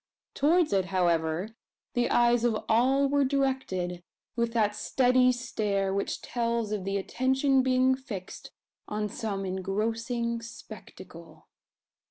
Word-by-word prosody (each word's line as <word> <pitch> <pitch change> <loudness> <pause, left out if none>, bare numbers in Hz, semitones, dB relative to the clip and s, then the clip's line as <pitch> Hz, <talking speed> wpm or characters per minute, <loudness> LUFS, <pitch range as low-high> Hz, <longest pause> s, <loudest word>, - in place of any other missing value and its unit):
Towards 320 - +2
it, 190 -2 +2
however, 175 -1 0 0.4
the 245 0 +1
eyes 240 0 +3
of 225 -3 0
all 260 +5 +3
were 285 0 +2
directed, 260 -11 -1 0.3
with 235 -1 0
that 210 -3 +1
steady 255 +2 +3
stare 205 -5 -1
which 200 0 -2
tells 235 -2 -1
of 205 -3 -3
the 195 0 -1
attention 265 +6 +1
being 260 0 +3
fixed 235 -9 -7 0.4
on 210 0 -2
some 205 -3 -4
engrossing 230 +5 -2
spectacle. 230 +1 -12
230 Hz, 120 wpm, -28 LUFS, 195-255 Hz, 0.4 s, eyes